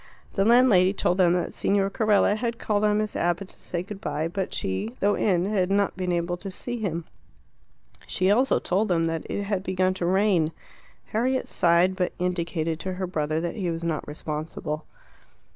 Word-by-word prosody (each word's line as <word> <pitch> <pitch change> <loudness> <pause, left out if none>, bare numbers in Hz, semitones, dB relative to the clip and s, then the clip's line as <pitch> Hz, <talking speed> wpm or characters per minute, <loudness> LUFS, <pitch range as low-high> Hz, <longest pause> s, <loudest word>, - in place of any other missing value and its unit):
The 195 - +2
landlady 220 -6 +5
told 185 -2 0
them 175 -2 +5
that 180 - -1
Signor 195 0 +1
Carella 210 -2 +3
had 235 +1 -2
called 210 -2 0
on 210 0 +3
Miss 215 0 -2
Abbott 175 +3 -1
to - - -16
say 175 -1 -3
good 200 +1 -9
bye, 155 -6 -2
but 190 +2 -3
she, 95 +3 -2
though 205 +1 +3
in, 180 -5 +1
had 195 -3 +1
not 200 0 +1
been 180 -1 -2
able 175 0 -1
to 195 +2 -7
see 240 +6 -5
him. 170 -6 -3 1.0
She 185 +1 +1
also 255 +6 +3
told 200 +4 0
them 170 -3 +2
that 165 -1 -3
it 205 - -2
had 200 -2 -1
begun 185 0 +1
to 180 -2 -2
rain. 185 -4 +2 0.6
Harriet 255 +4 0
sighed, 175 +2 +3
but 180 -1 -1
indicated 170 -2 -1
to 185 +1 -4
her 185 +1 -3
brother 155 -3 -1
that 170 +4 -3
he 185 -4 -1
was 165 0 -3
not 165 -3 -2
responsible. 150 +1 -5
185 Hz, 190 wpm, -25 LUFS, 170-205 Hz, 1.0 s, landlady